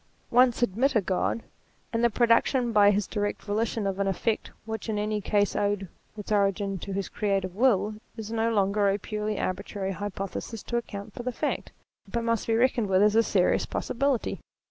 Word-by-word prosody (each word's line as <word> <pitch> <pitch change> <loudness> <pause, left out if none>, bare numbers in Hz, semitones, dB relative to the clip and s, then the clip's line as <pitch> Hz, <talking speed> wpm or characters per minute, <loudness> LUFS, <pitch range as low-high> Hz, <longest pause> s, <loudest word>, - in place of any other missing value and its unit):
Once 245 0 +4
admit 240 +5 +1
a - - +6
God, 190 +4 -1 0.5
and 230 +1 +1
the 235 - +5
production 235 +2 +3
by 205 -2 +6
his 205 -1 +2
direct 205 -1 -3
volition 215 +1 -1
of 195 0 -2
an 200 - +1
effect 210 +3 -1 0.2
which 220 0 -5
in 215 - -1
any 210 0 -1
case 205 0 +1
owed 205 -1 0 0.3
its 210 0 -7
origin 200 -1 +1
to 200 - -6
his 195 0 -2
creative 195 -3 -1
will, 215 -3 +3 0.2
is 220 -1 -6
no 230 0 +1
longer 200 -1 +2
a 195 - +1
purely 210 0 -3
arbitrary 190 +1 -3
hypothesis 200 +2 -5
to 240 - -4
account 205 -3 -4
for - - -6
the 250 +1 -2
fact, - - -3 0.4
but 235 -1 -1
must 230 -2 0
be 225 - +2
reckoned 235 -3 +2
with 190 +1 +4
as 210 0 +4
a 225 - +7
serious 195 -4 +2
possibility. 265 -1 -1
210 Hz, 190 wpm, -27 LUFS, 200-230 Hz, 0.5 s, a